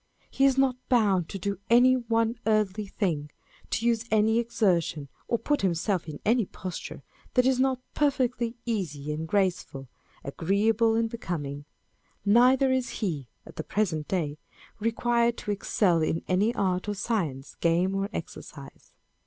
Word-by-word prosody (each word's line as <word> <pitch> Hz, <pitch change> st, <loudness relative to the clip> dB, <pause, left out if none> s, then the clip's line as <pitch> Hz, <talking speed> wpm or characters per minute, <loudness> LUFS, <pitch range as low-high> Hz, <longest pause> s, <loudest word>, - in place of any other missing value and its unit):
He 270 Hz, -, +2 dB
is 270 Hz, -1 st, +3 dB
not 265 Hz, -2 st, +3 dB
bound 200 Hz, -9 st, +3 dB
to -, -, -5 dB
do 200 Hz, 0 st, -3 dB
any 245 Hz, +2 st, +6 dB
one 230 Hz, -2 st, 0 dB
earthly 215 Hz, -1 st, +1 dB
thing; 165 Hz, -8 st, -2 dB, 0.4 s
to 230 Hz, -, -1 dB
use 230 Hz, -1 st, +2 dB
any 220 Hz, +1 st, +3 dB
exertion, 175 Hz, -, 0 dB, 0.2 s
or 235 Hz, -, +1 dB
put 295 Hz, +5 st, 0 dB
himself 180 Hz, -1 st, 0 dB
in 150 Hz, -, -7 dB
any 225 Hz, -2 st, +3 dB
posture, 185 Hz, -3 st, -7 dB, 0.3 s
that 250 Hz, -1 st, +4 dB
is 260 Hz, -1 st, +3 dB
not 260 Hz, -1 st, +1 dB
perfectly 250 Hz, -5 st, 0 dB
easy 150 Hz, -10 st, -3 dB
and 160 Hz, +2 st, -4 dB
graceful, 180 Hz, -8 st, -1 dB, 0.4 s
agreeable 210 Hz, -, +1 dB
and 230 Hz, 0 st, +2 dB
becoming. 150 Hz, -10 st, -5 dB, 0.6 s
Neither 250 Hz, +5 st, +5 dB
is 260 Hz, -1 st, 0 dB, 0.2 s
he 150 Hz, -9 st, -3 dB, 0.2 s
(at -, -, -14 dB
the 160 Hz, -, -3 dB
present 165 Hz, -8 st, -1 dB
day) 155 Hz, -6 st, -2 dB, 0.4 s
required 235 Hz, +1 st, +1 dB
to 210 Hz, -, -4 dB
excel 190 Hz, -3 st, +1 dB
in 160 Hz, +1 st, -1 dB
any 195 Hz, +5 st, +2 dB
art 185 Hz, 0 st, 0 dB
or 205 Hz, -, -2 dB
science, 175 Hz, -, -2 dB
game 170 Hz, +3 st, +2 dB
or 195 Hz, +1 st, -1 dB
exercise. -, -, -9 dB
205 Hz, 150 wpm, -27 LUFS, 170-235 Hz, 0.6 s, any